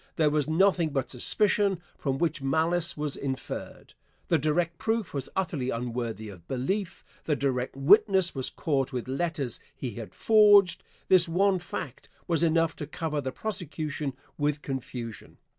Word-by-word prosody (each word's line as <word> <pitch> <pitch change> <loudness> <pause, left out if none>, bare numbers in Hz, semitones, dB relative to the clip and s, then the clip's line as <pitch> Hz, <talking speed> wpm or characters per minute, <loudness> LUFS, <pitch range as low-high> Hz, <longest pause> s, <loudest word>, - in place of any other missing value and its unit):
There 155 -3 +3
was 150 -1 +1
nothing 175 0 +3
but 135 -3 -2
suspicion, 200 - +1 0.2
from 135 -2 -2
which 160 -1 0
malice 160 +5 +1
was 150 -1 -2
inferred. 135 -2 -6 0.4
The - - +4
direct 165 +2 0
proof 220 -2 -1
was 140 -2 -3
utterly 160 -9 -1
unworthy 115 -2 -3
of 90 -4 -13
belief. 185 +9 -2 0.2
The 150 - +1
direct 130 -3 -1
witness 190 +5 +5
was 130 -2 -2
caught 135 -3 -1
with 125 -2 -4
letters 140 -2 -2 0.2
he 125 - -4
had 115 0 -9
forged. 205 -4 +6 0.3
This 180 -2 +5
one 190 +2 +3
fact 155 -7 -7 0.2
was 165 -2 +1
enough 165 -1 +2
to 150 - -5
cover 150 -1 -3
the 130 -1 -3
prosecution 155 -7 -4 0.3
with 145 0 0
confusion. 125 -4 -6
150 Hz, 150 wpm, -28 LUFS, 135-175 Hz, 0.4 s, forged